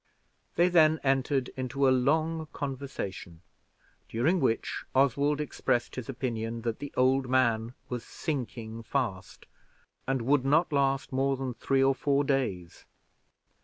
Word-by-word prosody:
They 175 - +4
then 160 -3 +5
entered 135 -1 +1
into 130 +1 -1
a - - +5
long 155 +5 +1
conversation, 130 - -6 0.7
during 150 +11 +1
which 130 -6 -1
Oswald 140 +2 +3
expressed 130 -4 -1
his 125 -1 -6
opinion 115 -3 -3
that 115 -2 -2
the 145 - -6
old 130 0 +3
man 120 -2 +1
was 125 -2 -4
sinking 115 -6 -5
fast, 115 -5 -3 0.6
and 135 -2 0
would 135 +2 +3
not 155 +4 +2
last 135 -1 +1
more 135 +1 +1
than 130 -1 -3
three 135 +2 +1
or 135 0 +4
four 140 +1 +1
days. 125 -12 -2
135 Hz, 130 wpm, -29 LUFS, 120-140 Hz, 0.7 s, then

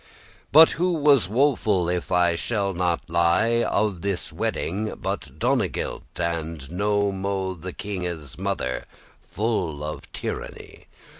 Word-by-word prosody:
But 160 +3 +9
who 180 +2 +1
was 140 - +4
woeful, 110 -7 +2
if 90 +1 -2
I 90 -1 +3
shall 100 +1 -1
not 85 -1 -1
lie, 85 +8 +3
Of 105 -6 0
this 100 -2 -2
wedding 105 +5 -2
but 70 +1 -4
Donegild, 120 - 0 0.2
and 80 -3 -3
no 100 +2 +1
mo', 95 -1 -2
The 90 +1 -7
kinge's 90 -8 -5
mother, 90 -10 -2 0.4
full 95 -9 -2
of 75 +1 -6
tyranny? - - -6
95 Hz, 125 wpm, -24 LUFS, 85-105 Hz, 0.4 s, But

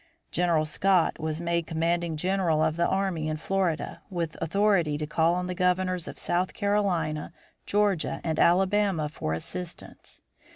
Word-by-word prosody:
General 170 -3 +2
Scott 185 +2 +2
was 155 0 -2
made 170 -1 -1
commanding 165 0 0
general 180 -2 +1
of 160 0 +1
the 170 +1 +2
army 190 -5 -1
in 155 0 -2
Florida, 185 -1 -1
with 170 -4 -3
authority 185 -5 +2
to 150 - -3
call 165 +3 +2
on 180 0 -2
the 180 - -3
governors 180 -1 0
of - - -7
South 180 +2 -1
Carolina, 180 -8 0 0.4
Georgia, 205 -5 +1
and 160 -2 -1
Alabama 190 -2 +3
for 80 - -3
assistance. 170 - -7
170 Hz, 150 wpm, -27 LUFS, 160-190 Hz, 0.4 s, Alabama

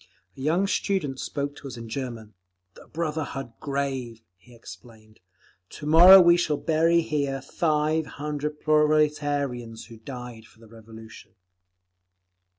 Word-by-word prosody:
A - - -11
young 165 +7 +1
student 185 -9 -2
spoke 145 0 -4
to 140 - -10
us 125 -3 -9
in 115 0 -8
German. 115 -3 -6 0.4
"The - - -17
Brotherhood 155 -6 -4
Grave," 135 -5 -4
he 120 +7 -20
explained. 110 -2 -15 0.5
"To 150 - -10
morrow 175 +5 +9
we 175 -1 +6
shall 155 -4 0
bury 165 +2 +2
here 145 -4 -2
five 155 +2 -1
hundred 150 0 -4
proletarians 145 -6 0
who 115 - -13
died 125 -1 -9
for 110 - -23
the 115 - -17
Revolution." 110 0 -14
140 Hz, 130 wpm, -25 LUFS, 120-155 Hz, 0.5 s, morrow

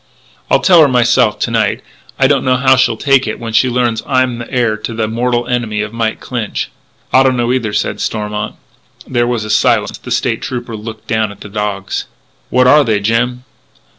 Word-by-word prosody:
"I'll - - +3
tell 175 -4 +6
her 150 - +6
myself 120 -4 +2
to 115 - 0
night. 110 -3 0 0.3
I 135 - +3
don't 135 -1 +2
know 130 0 +2
how 130 +1 +4
she'll 120 -3 +2
take 135 -1 +2
it 110 - -4
when 115 -1 -6
she 130 +3 +3
learns 120 -2 0
I'm 130 -3 +1
the 115 - -8
heir 120 -4 +1
to 110 +1 -6
the 110 -1 -1
mortal 120 +2 -1
enemy 115 -4 -1
of 110 +1 -7
Mike 115 -1 -2
Clinch." 120 -4 -4 0.4
"I 130 - +6
don't 130 -1 +2
know 120 +1 +1
either," 120 -5 -1
said - - -2
Stormont. 105 -1 -3 0.5
There 120 -2 0
was 120 -3 -1
a 105 - -3
silence; - - +1
the - - -10
State - - 0
Trooper 120 -3 -5
looked 110 +1 -8
down 110 -2 0
at 100 - -14
the 100 - -9
dogs: 100 -2 -3 0.4
"What 125 0 +3
are 150 +4 +6
they, 110 -5 +1
Jim?" 120 +4 0
120 Hz, 205 wpm, -15 LUFS, 110-125 Hz, 0.5 s, tell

